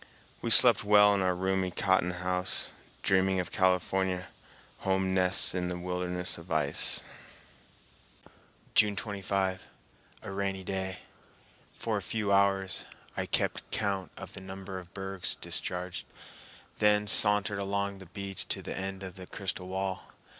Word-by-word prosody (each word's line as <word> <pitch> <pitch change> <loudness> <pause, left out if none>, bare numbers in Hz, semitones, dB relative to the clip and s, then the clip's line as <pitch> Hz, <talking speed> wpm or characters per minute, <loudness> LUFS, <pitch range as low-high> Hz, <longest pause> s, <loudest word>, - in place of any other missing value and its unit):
We 115 - -2
slept 115 -1 +8
well 105 0 +6
in 100 - +1
our 90 -1 +1
roomy 95 0 0
cotton 95 0 +1
house, 90 0 +1 0.3
dreaming 95 0 +2
of 90 - -3
California 95 0 +1 0.5
home 95 -1 0
nests 95 0 +3
in 90 -1 -1
the 90 0 -3
wilderness 90 0 -2
of 85 +1 -14
ice. 75 -3 +3 1.7
June 105 -1 +5
25. 95 -2 -2 0.5
A - - -6
rainy 95 -1 -3
day. 95 0 -4 0.8
For - - -1
a - - -3
few 105 -3 -2
hours 100 -1 +2 0.3
I - - -3
kept - - -1
count 100 -3 -2
of - - -9
the - - -7
number 95 0 -7
of 90 -1 -14
bergs 95 -1 -3
discharged, 90 0 -4 0.7
then 105 0 +3
sauntered 105 0 +4
along 100 0 -2
the 95 - -12
beach 95 +1 -6
to - - -2
the - - -5
end 95 0 -5
of 95 -1 -8
the 90 -1 -10
crystal 90 -1 -5
wall. 95 0 -3
95 Hz, 140 wpm, -30 LUFS, 90-100 Hz, 1.7 s, slept